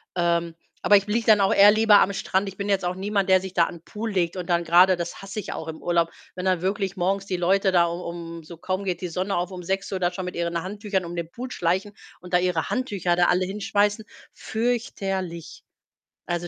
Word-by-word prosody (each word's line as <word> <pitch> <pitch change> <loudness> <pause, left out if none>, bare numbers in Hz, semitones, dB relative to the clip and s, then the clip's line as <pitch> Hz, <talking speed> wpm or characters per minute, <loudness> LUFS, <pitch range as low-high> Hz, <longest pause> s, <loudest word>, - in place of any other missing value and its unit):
Ähm, 170 -1 0 0.3
aber 205 - +6
ich 200 +1 -2
liege 225 +2 0
dann 215 -2 +6
auch 195 - +3
eher 205 +1 +8
lieber 215 -1 +6
am 200 - +2
Strand. 195 0 -1
Ich 195 - -13
bin 200 0 -3
jetzt 195 -2 +1
auch 175 +1 -1
niemand, 195 0 -1
der 185 0 +5
sich 190 -1 -7
da 170 - +4
an - - -7
'n - - -19
Pool 220 +4 -5
legt 180 -2 0
und 180 -2 -5
dann 170 -1 +2
grade 180 +3 +5
das 170 -1 -6
hasse 195 +2 -6
ich 200 - -5
auch 160 - -6
im 160 -1 -7
Urlaub, 170 -1 +1 0.2
wenn 180 0 -5
dann 185 -2 +1
wirklich 195 0 -2
morgens 195 +2 0
die 185 -2 -2
Leute 190 +2 +2
da 175 -2 +4
u 170 - -4
um 170 -1 -7
so 165 +2 -11
kaum 185 +4 -3
geht 180 -3 -3
die 180 - -2
Sonne 185 +4 -2
auf, 175 0 -1
um 180 -1 -7
6:00 190 +1 -2
da 175 -1 +1
schon 180 +1 -5
mit 180 - -6
ihren 170 0 -2
Handtüchern 195 0 -3
um 170 +1 -7
den 170 -1 -5
Pool 250 +6 -7
schleichen 190 +3 -1 0.3
und 180 0 -12
da - - +6
ihre 180 -3 -1
Handtücher 200 -9 0
da 175 0 +3
alle 180 +1 +2
hinschmeißen. 205 +2 0 0.3
Fürchterlich. 195 - -3 0.6
Also, 175 0 -2
185 Hz, 240 wpm, -24 LUFS, 175-200 Hz, 0.6 s, eher